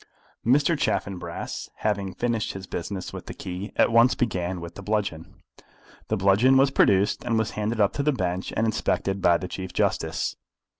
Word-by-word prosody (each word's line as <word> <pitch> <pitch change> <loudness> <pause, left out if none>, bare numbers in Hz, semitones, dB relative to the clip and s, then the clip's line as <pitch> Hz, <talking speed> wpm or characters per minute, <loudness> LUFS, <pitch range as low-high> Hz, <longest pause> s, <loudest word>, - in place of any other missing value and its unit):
Mr. 145 +7 +3
Chaffanbrass, 100 - -3
having 100 -3 -2
finished 120 -2 -1
his 95 -1 -7
business 95 +1 -5
with - - -8
the - - -7
key, 90 +3 -6
at - - +4
once 115 +2 +5
began 95 -6 -1
with 85 0 -8
the - - -9
bludgeon. 100 -6 -2 0.7
The 110 - 0
bludgeon 100 +8 +4
was 135 +1 +4
produced, 100 -5 +3
and 115 -2 0
was 110 -1 0
handed 110 +2 -2
up 100 -2 +3
to - - -1
the 150 +2 +2
bench, 90 -6 -2
and 110 - +2
inspected 100 -3 0
by 85 -2 +5
the 95 - -5
Chief 95 0 -6
Justice. - - -1
100 Hz, 180 wpm, -25 LUFS, 95-115 Hz, 0.7 s, once